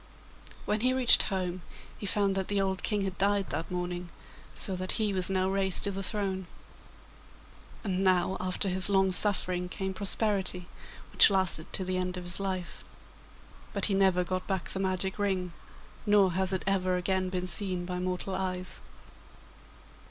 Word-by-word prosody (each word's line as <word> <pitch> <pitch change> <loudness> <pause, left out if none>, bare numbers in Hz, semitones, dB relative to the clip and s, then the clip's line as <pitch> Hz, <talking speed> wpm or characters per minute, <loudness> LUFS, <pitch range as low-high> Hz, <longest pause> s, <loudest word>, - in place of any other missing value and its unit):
When 210 +1 0
he 255 +2 +2
reached 255 -2 +6
home 185 -2 -3 0.3
he 205 - -7
found 200 0 +1
that 190 -1 -2
the 205 -1 0
old 190 -1 -1
King 205 -2 0
had 190 -1 -5
died 200 0 +1
that 165 - -3
morning, 180 0 -4 0.5
so 190 - -2
that 185 0 -3
he 215 -3 0
was 185 -1 +2
now 190 -1 +1
raised 190 -1 -1
to 200 - -1
the 195 0 -4
throne. 195 -2 -2 1.4
And 190 -3 -1
now 185 0 +2
after 185 +2 -1
his 190 +1 +6
long 190 -1 +3
suffering 180 -2 +3
came 190 +1 -4
prosperity, 195 -2 0 0.4
which - - +7
lasted 185 -5 -1
to 190 - -2
the 185 0 -2
end 185 0 -2
of 180 - -6
his 175 +1 +1
life; 190 -2 -4 0.9
but - - +3
he 205 - +2
never 190 -2 +3
got 185 +1 -4
back 190 -3 -2
the 190 - -3
magic 190 +1 -1
ring, 185 -3 -1 0.5
nor 205 -3 +4
has 190 +2 -1
it 190 - 0
ever 185 -1 +1
again 185 +1 -1
been 180 -1 -3
seen 180 0 -2
by 180 0 -4
mortal 185 +1 -3
eyes. 185 -1 -2
190 Hz, 170 wpm, -29 LUFS, 180-195 Hz, 1.4 s, which